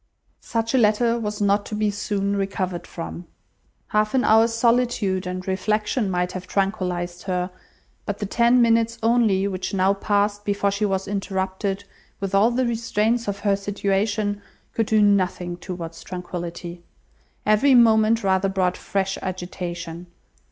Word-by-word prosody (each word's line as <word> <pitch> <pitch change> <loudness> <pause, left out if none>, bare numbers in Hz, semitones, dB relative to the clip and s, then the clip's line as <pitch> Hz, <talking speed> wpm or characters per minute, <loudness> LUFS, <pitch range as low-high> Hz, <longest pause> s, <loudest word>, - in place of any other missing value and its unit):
Such 230 +1 -2
a 260 - +4
letter 230 +2 +3
was 210 -2 -3
not 205 0 +2
to 215 - -4
be 210 -1 +1
soon 200 0 -1
recovered 190 -3 -2
from. 170 +1 -7 0.6
Half 215 +3 +1
an 260 - +3
hour's 225 +1 +5
solitude 230 -5 +1
and 185 +1 -5
reflection 210 +3 0
might 180 -1 0
have 185 -1 -7
tranquillized 180 -3 -2
her; 180 -1 -1 0.6
but 205 - -2
the 205 - -3
ten 235 +4 +4
minutes 230 0 +2
only 225 -4 +3
which 185 0 -3
now 190 +1 +3
passed 205 +1 0
before 200 -1 0
she 200 +2 0
was 195 0 -2
interrupted, 195 0 -2 0.4
with 195 -1 -4
all 200 +4 +5
the 250 +1 0
restraints 230 0 0
of 200 0 -3
her 200 -2 +2
situation, 205 +1 -1 0.3
could 225 -2 0
do 215 -1 +4
nothing 185 -3 +1
towards 170 -2 -7
tranquillity. 175 -1 -6 0.6
Every 220 +6 +4
moment 225 -1 +5
rather 190 0 +2
brought 185 -2 0
fresh 195 -1 -2
agitation. 175 -2 -5
200 Hz, 145 wpm, -23 LUFS, 185-215 Hz, 0.6 s, hour's